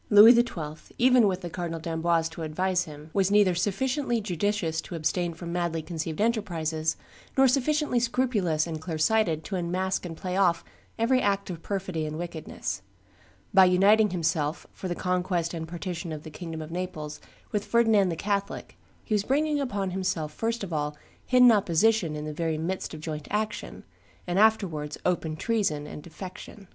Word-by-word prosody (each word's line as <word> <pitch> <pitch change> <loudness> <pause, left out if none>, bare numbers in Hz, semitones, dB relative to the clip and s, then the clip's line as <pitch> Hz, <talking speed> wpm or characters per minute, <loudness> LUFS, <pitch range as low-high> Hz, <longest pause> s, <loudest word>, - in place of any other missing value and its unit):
Louis 210 +3 +10
XII., 165 -11 -2
even 250 -2 +5
with 185 -1 -1
the 175 - -5
Cardinal 170 -2 -4
d'Amboise 165 0 0
to 165 - -9
advise 180 +3 0
him, 150 0 -11
was 195 -1 +2
neither 205 -2 +5
sufficiently 240 - 0
judicious 195 -4 -1
to 175 - -8
abstain 170 +1 -1
from 170 0 -6
madly 170 -2 -1
conceived 160 -2 -4
enterprises, 170 -8 0 0.4
nor 265 0 +7
sufficiently 280 0 +2
scrupulous 230 -10 +1
and 160 -2 -5
clear 160 -1 -4
sighted 165 -2 +2
to 195 - -4
unmask 185 +2 -1
and 165 -3 -6
play 180 +1 -3
off 175 -4 +3 0.3
every 255 +3 +3
act 200 -1 0
of 170 -2 -7
perfidy 185 -6 -3
and 155 0 -5
wickedness: 170 -2 -5 0.7
by 190 -1 +8
uniting 200 +4 +5
himself, 165 -3 -1
for 190 - -6
the 175 - -2
conquest 180 -2 -1
and 160 -1 -4
partition 175 0 -5
of 155 -1 -6
the 155 - -9
kingdom 160 0 -6
of 155 - -10
Naples, 170 -4 -5 0.3
with 205 -1 0
Ferdinand 225 -4 +3
the 165 - -2
Catholic, 200 +3 -3 0.2
he 220 - -3
was 205 -1 +2
bringing 295 +4 +1
upon 200 -8 -2
himself 180 -5 -2
first 230 +3 -2
of 180 -4 -5
all 150 -1 -2 0.3
hidden 250 -1 +7
opposition 200 -3 +2
in 150 0 -5
the 155 - -4
very 160 0 -1
midst 170 +1 -3
of 155 - -9
joint 155 -2 -5
action, 215 +1 -3 0.4
and 180 +2 0
afterwards 180 -9 +2
open 165 -3 0
treason 190 -7 0
and 150 - -8
defection. 185 +4 -10
180 Hz, 175 wpm, -27 LUFS, 160-210 Hz, 0.7 s, Louis